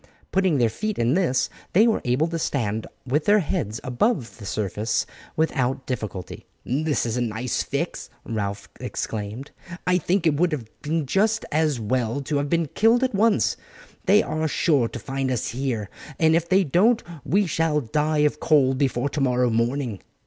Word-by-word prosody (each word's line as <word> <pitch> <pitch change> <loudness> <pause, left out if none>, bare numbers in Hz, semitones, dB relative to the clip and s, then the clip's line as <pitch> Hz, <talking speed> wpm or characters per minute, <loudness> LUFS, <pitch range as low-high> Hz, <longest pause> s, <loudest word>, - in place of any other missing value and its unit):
Putting 185 -5 +2
their 120 -3 +4
feet 215 - -3
in 120 +2 +2
this, 165 -8 +2 0.3
they 210 +5 +6
were 225 -2 +2
able 125 +6 +2
to 165 0 -3
stand 110 -8 -1 0.2
with 145 +4 0
their 205 +1 +5
heads 140 - -2
above 130 - -1
the 100 - -7
surface 105 +2 -1 0.3
without 135 -4 0
difficulty. 110 -7 -5 0.2
"This 150 +3 0
is 115 +1 -2
a - - 0
nice 120 +1 -1
fix," - - -3 0.2
Ralph 100 -3 -3
exclaimed. 110 +5 -5 0.3
"I 180 0 +3
think 180 +2 0
it 160 - +4
would 175 -1 +2
have 130 -7 -3 0.2
been 155 +1 -1
just 210 +10 +1
as 155 -4 +1
well 120 +3 -1
to 145 +2 -1
have 140 0 -1
been 170 +1 +2
killed 230 +4 +4
at 260 - +1
once. 215 +2 +2 0.5
They 205 +2 +6
are 155 0 -1
sure 145 -5 +2
to - - -7
find 135 -1 -3
us 125 -3 -1
here, 120 -4 -2 0.3
and 160 0 +4
if 170 0 0
they 190 +1 +4
don't 205 - +3 0.2
we 200 +3 +2
shall 160 -2 +1
die 150 +4 +1
of 150 0 0
cold 135 -4 +3
before 135 -1 +1
tomorrow 125 -4 +1
morning." 115 -1 -1
140 Hz, 175 wpm, -24 LUFS, 120-170 Hz, 0.5 s, they